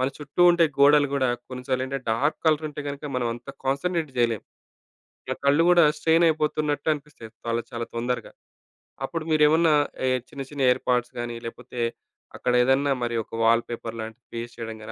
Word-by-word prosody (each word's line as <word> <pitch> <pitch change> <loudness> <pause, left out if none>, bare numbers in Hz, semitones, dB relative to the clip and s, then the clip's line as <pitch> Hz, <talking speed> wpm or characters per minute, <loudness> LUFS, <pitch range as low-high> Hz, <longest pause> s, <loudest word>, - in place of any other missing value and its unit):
మన 130 - +2
చుట్టూ 150 +4 -1
ఉండే 175 -1 +4
గోడలు 145 +1 +6
గూడా 130 -2 +1 0.2
కొన్ని 125 -1 -7
సార్లేంటంటే 130 0 -2
డార్క్ 140 +7 +1
కలర్ 155 -1 +3
ఉంటే 150 0 -7
గనక 140 +1 -6
మనం 125 -1 0
అంత 120 +3 -13 0.2
కాన్సంట్రేట్ 155 +4 -1
జేయలేం. 115 -3 +1 0.9
ఇగ - - -2
కళ్ళు 145 +4 +4
గూడా 175 -1 +6
స్ట్రెయినయిపోతున్నట్టు 155 -2 +1
అనిపిస్తయి 145 -6 -10 0.2
చాలా 115 0 0
చాలా 115 0 -4
తొందరగా. 120 0 -2 0.7
అప్పుడు 165 +4 -3
మీరేమన్నా 155 +1 +4 0.3
ఏ - - +3 0.2
చిన్న 140 - -7
చిన్న 145 -2 -5
ఏర్పాట్స్ 125 -1 -1
గాని, 120 0 -4
లేకపోతే 125 +1 -8 0.6
అక్కడేదన్నా 135 +3 +2
మరి 120 0 -1
ఒక - - -33
వాల్ 115 +1 +4
పేపర్ 115 -1 -6
లాంటిది 110 +2 -9
పేస్ట్ 120 0 -6
చేయడం 115 -1 -5
గాని, 110 - -8
135 Hz, 160 wpm, -25 LUFS, 120-150 Hz, 0.9 s, గోడలు